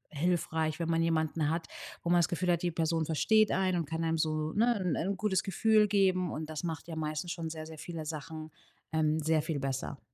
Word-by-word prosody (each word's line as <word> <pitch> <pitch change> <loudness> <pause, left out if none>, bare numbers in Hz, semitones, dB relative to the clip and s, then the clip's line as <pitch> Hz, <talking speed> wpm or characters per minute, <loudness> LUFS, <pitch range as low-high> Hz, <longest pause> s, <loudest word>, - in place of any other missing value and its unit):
hilfreich, 160 -1 0
wenn 165 -1 -2
man 165 0 +2
jemanden 160 -2 +1
hat, 165 +1 -1 0.4
wo 170 - -2
man 175 - +5
das 170 - +3
Gefühl 175 +1 0
hat, 170 -1 +1
die 175 - +1
Person 165 0 0
versteht 215 +7 +3
einen 185 -2 +1
und 165 - -2
kann 165 0 -2
einem 165 0 +1
so, 155 0 0
ne, 235 +3 +3
'n 180 -4 0
'n 190 +4 -1
gutes 190 -2 +1
Gefühl 215 +2 +3
geben, 185 -3 +2
und 155 0 -5
das 155 +1 -5
macht 165 -1 -4
ja 165 - -5
meistens 155 +2 -3
schon 165 -2 -4
sehr, 155 -1 -6
sehr 160 -1 -10
viele 165 -2 -6
Sachen, 155 +1 -6 0.4
ähm, 155 -1 +2
sehr 160 0 +2
viel 155 -3 -2
besser. 135 0 -3
165 Hz, 225 wpm, -31 LUFS, 155-180 Hz, 0.4 s, man